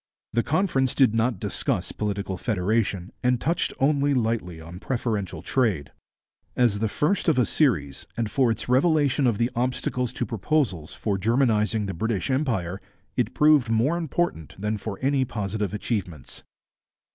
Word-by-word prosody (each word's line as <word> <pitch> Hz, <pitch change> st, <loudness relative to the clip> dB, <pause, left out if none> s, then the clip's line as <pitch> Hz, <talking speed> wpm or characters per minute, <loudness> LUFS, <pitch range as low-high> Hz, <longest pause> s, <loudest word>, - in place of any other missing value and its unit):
The 115 Hz, -, +3 dB
Conference 140 Hz, -4 st, +1 dB
did 130 Hz, -5 st, +4 dB
not 115 Hz, -2 st, +1 dB
discuss -, -, -2 dB
political 100 Hz, -2 st, -3 dB
federation 100 Hz, -2 st, -1 dB
and 125 Hz, -1 st, +2 dB
touched 165 Hz, +7 st, 0 dB
only 140 Hz, 0 st, +2 dB
lightly 110 Hz, -8 st, -1 dB
on 85 Hz, +3 st, -9 dB
preferential 110 Hz, -5 st, -2 dB
trade. 100 Hz, -, 0 dB, 0.6 s
As 120 Hz, -5 st, +2 dB
the 110 Hz, 0 st, 0 dB
first 175 Hz, -, 0 dB
of 160 Hz, -5 st, +4 dB
a 125 Hz, -, +4 dB
series, 80 Hz, -, 0 dB
and 115 Hz, -2 st, 0 dB
for 130 Hz, 0 st, +3 dB
its 115 Hz, -, -2 dB
revelation 145 Hz, 0 st, +3 dB
of 115 Hz, -4 st, +1 dB
the 120 Hz, +3 st, +1 dB
obstacles 125 Hz, 0 st, -1 dB
to -, -, -2 dB
proposals 110 Hz, -, -1 dB
for 100 Hz, -3 st, -1 dB
Germanizing 110 Hz, -2 st, +2 dB
the 95 Hz, -, -3 dB
British 110 Hz, +5 st, -1 dB
Empire, 110 Hz, -, -1 dB, 0.3 s
it 120 Hz, -3 st, -1 dB
proved 150 Hz, -5 st, +5 dB
more 115 Hz, +8 st, +2 dB
important 165 Hz, -, -2 dB
than 105 Hz, +1 st, -2 dB
for 100 Hz, -1 st, -5 dB
any 135 Hz, 0 st, +2 dB
positive 105 Hz, -4 st, -3 dB
achievements. 100 Hz, -, -4 dB
115 Hz, 150 wpm, -25 LUFS, 100-130 Hz, 0.6 s, proved